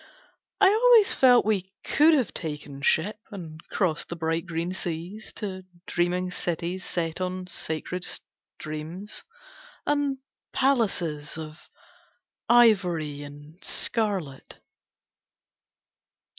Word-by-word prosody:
I 395 Hz, -2 st, +7 dB
always 450 Hz, 0 st, +6 dB
felt 250 Hz, -4 st, +6 dB
we 195 Hz, -3 st, 0 dB
could 310 Hz, +2 st, +5 dB
have 260 Hz, -6 st, 0 dB
taken 150 Hz, -3 st, -5 dB
ship 200 Hz, +9 st, +2 dB
And 165 Hz, -7 st, -8 dB
crossed 175 Hz, -6 st, 0 dB
the 170 Hz, -, -4 dB
bright 165 Hz, +1 st, -1 dB
green 170 Hz, +2 st, -2 dB
seas 180 Hz, +4 st, -5 dB
To 190 Hz, -3 st, -5 dB, 0.2 s
dreaming 180 Hz, +1 st, 0 dB
cities 175 Hz, +1 st, -3 dB
set 165 Hz, 0 st, -3 dB
on 185 Hz, 0 st, -2 dB
sacred 175 Hz, +1 st, -4 dB
streams 155 Hz, +8 st, -7 dB, 0.6 s
And 290 Hz, -2 st, +1 dB, 0.4 s
palaces 195 Hz, -, +1 dB
Of 155 Hz, 0 st, -9 dB, 0.8 s
ivory 180 Hz, -11 st, +4 dB
and 145 Hz, +4 st, -12 dB
scarlet. 195 Hz, -, -1 dB
180 Hz, 100 wpm, -26 LUFS, 160-215 Hz, 0.8 s, I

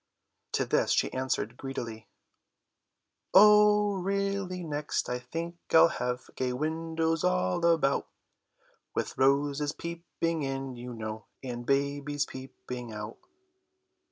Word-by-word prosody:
To -, -, +1 dB
this -, -, +2 dB
she -, -, +1 dB
answered 125 Hz, -3 st, -2 dB
greedily: 115 Hz, -5 st, -6 dB, 1.3 s
"Oh, 210 Hz, 0 st, +7 dB
really 195 Hz, -1 st, -1 dB
next 150 Hz, -2 st, -2 dB
I 125 Hz, 0 st, -2 dB
think 165 Hz, +7 st, -5 dB
I'll 165 Hz, +1 st, +8 dB
have 125 Hz, -3 st, -3 dB
Gay 125 Hz, -1 st, -1 dB
windows 160 Hz, +3 st, -1 dB
all 130 Hz, -, +1 dB
about, 165 Hz, -5 st, +3 dB, 0.9 s
With -, -, -2 dB
roses 145 Hz, +2 st, +2 dB
peeping 170 Hz, -1 st, -3 dB
in, 135 Hz, -2 st, -3 dB
you 120 Hz, 0 st, -7 dB
know, 110 Hz, 0 st, -6 dB, 0.2 s
And 120 Hz, -2 st, -5 dB
babies 140 Hz, +1 st, 0 dB
peeping 125 Hz, -2 st, -8 dB
out." 105 Hz, +1 st, -7 dB
140 Hz, 110 wpm, -29 LUFS, 125-170 Hz, 1.3 s, I'll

